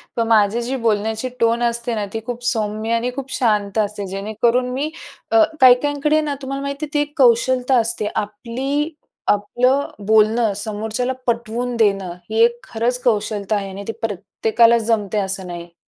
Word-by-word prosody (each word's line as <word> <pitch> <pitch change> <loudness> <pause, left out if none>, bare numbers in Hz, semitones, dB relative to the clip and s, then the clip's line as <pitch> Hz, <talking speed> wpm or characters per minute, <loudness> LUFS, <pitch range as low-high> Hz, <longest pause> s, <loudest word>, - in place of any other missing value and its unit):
पण 230 -1 0
माझी 220 +1 +3
जी 250 +3 -3
बोलण्याची 220 +3 0
टोन 230 +1 +2
असते 235 0 -1
ना, 210 -2 -2
ती 225 - -2
खूप 245 0 -5
सौम्य 220 -1 -1
आणि 240 +2 0
खूप 270 -1 -6
शांत 210 -4 0
असते. 205 -1 -1
जेणेकरून 220 +6 0
मी 280 +4 -1 0.4
अ, 335 -1 +6 0.2
काही 255 -1 +9
काहींकडे 290 +1 +1
ना, 295 -2 -2
तुम्हाला 275 +1 -4
माहिती 280 +2 -3
आहे 300 - -16
ती 295 - +2
एक 295 0 -4
कौशलता 255 +1 +3
असते. 225 -2 -1
आपली 255 +8 -2 0.4
आपलं 250 +7 +1 0.2
बोलणं 220 +1 +3
समोरच्याला 220 +4 -2
पटवून 235 +1 -1
देणं, 195 -5 +1 0.2
ही 225 +1 +3
एक 235 0 +2
खरंच 240 +2 -1
कौशलता 215 -2 0
आहे 195 -1 -3
आणि 195 +1 -7
ती - - -1
प्रत्येकालाच 225 +3 +2
जमते 215 -2 0
असं 190 -1 -3
नाही. 175 -1 -8
230 Hz, 165 wpm, -20 LUFS, 210-250 Hz, 0.4 s, काही